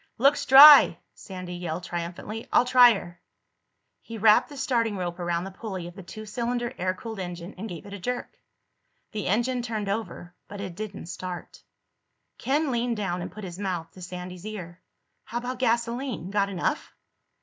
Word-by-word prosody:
"Looks 275 Hz, +5 st, +3 dB
dry!" 285 Hz, +2 st, +10 dB, 0.2 s
Sandy 185 Hz, -2 st, -8 dB
yelled 175 Hz, -1 st, -4 dB
triumphantly. 175 Hz, +6 st, -5 dB
"I'll -, -, +5 dB
try 245 Hz, -2 st, +7 dB
her." 175 Hz, -2 st, -9 dB, 0.8 s
He 230 Hz, -, -8 dB
wrapped 215 Hz, 0 st, +5 dB
the 290 Hz, -, -10 dB
starting 230 Hz, -6 st, 0 dB
rope 175 Hz, -1 st, -4 dB
around 175 Hz, -1 st, -1 dB
the 195 Hz, -, -7 dB
pulley 190 Hz, -3 st, -6 dB
of 175 Hz, -, -9 dB
the 195 Hz, -, -10 dB
two 215 Hz, +4 st, -9 dB
cylinder 240 Hz, +2 st, -2 dB
air 185 Hz, +1 st, 0 dB
cooled 220 Hz, +1 st, -7 dB
engine 175 Hz, 0 st, -6 dB
and 220 Hz, +4 st, -6 dB
gave 175 Hz, -1 st, -8 dB
it 200 Hz, -, -10 dB
a 200 Hz, -, -7 dB
jerk. 245 Hz, +6 st, -4 dB, 0.8 s
The 210 Hz, -3 st, -4 dB
engine 240 Hz, +5 st, +1 dB
turned 220 Hz, -4 st, -3 dB
over, 200 Hz, -4 st, -4 dB
but 205 Hz, -, -9 dB
it 190 Hz, -3 st, -5 dB
didn't 210 Hz, 0 st, -7 dB
start. 180 Hz, +1 st, -7 dB, 0.8 s
Ken 285 Hz, +2 st, 0 dB
leaned 240 Hz, -1 st, -1 dB
down 180 Hz, -4 st, -2 dB
and -, -, -6 dB
put 210 Hz, +3 st, -10 dB
his 180 Hz, -1 st, -7 dB
mouth 180 Hz, -5 st, -3 dB
to 185 Hz, -, -14 dB
Sandy's 180 Hz, 0 st, -8 dB
ear. 185 Hz, -5 st, -8 dB, 0.4 s
"How 235 Hz, -, -5 dB
about 245 Hz, +1 st, -4 dB
gasoline? 235 Hz, -, -1 dB
Got 200 Hz, -1 st, +1 dB
enough?" 185 Hz, -3 st, -2 dB
205 Hz, 175 wpm, -26 LUFS, 180-235 Hz, 0.8 s, dry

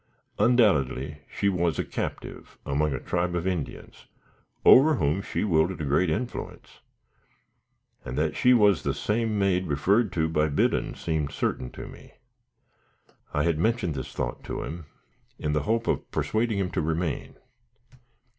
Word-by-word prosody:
Undoubtedly 75 Hz, -, +2 dB
she 100 Hz, -, -1 dB
was 85 Hz, -4 st, +1 dB
a -, -, -1 dB
captive -, -, -6 dB
among 75 Hz, +2 st, 0 dB
a 65 Hz, -, -2 dB
tribe 90 Hz, 0 st, -1 dB
of 85 Hz, 0 st, -2 dB
Indians, 90 Hz, -5 st, -5 dB, 0.6 s
over 150 Hz, +4 st, +8 dB
whom 75 Hz, -, 0 dB
she -, -, -3 dB
wielded 85 Hz, -2 st, +1 dB
a 75 Hz, -, -3 dB
great 70 Hz, +6 st, +2 dB
influence; 120 Hz, +9 st, -5 dB, 1.2 s
and 65 Hz, -, -6 dB
that 75 Hz, +1 st, 0 dB
she 125 Hz, -, +4 dB
was 105 Hz, -7 st, +5 dB
the -, -, -1 dB
same 110 Hz, 0 st, -1 dB
maid 95 Hz, -2 st, +1 dB
referred 95 Hz, -, +2 dB
to 80 Hz, -2 st, 0 dB
by 75 Hz, -1 st, +1 dB
Biddon, 70 Hz, -1 st, 0 dB
seemed 80 Hz, -3 st, -2 dB
certain 65 Hz, -, -2 dB
to -, -, -8 dB
me. -, -, -14 dB, 1.2 s
I 75 Hz, -, 0 dB
had 85 Hz, -2 st, +1 dB
mentioned 110 Hz, -3 st, +1 dB
this 65 Hz, -, -6 dB
thought -, -, -4 dB
to -, -, -4 dB
him, 80 Hz, -1 st, -7 dB, 0.5 s
in 75 Hz, -, -2 dB
the 75 Hz, -, +1 dB
hope 115 Hz, +1 st, +1 dB
of -, -, -1 dB
persuading 110 Hz, -1 st, 0 dB
him 95 Hz, -2 st, -1 dB
to -, -, -1 dB
remain. 80 Hz, 0 st, -2 dB
85 Hz, 155 wpm, -26 LUFS, 75-105 Hz, 1.2 s, over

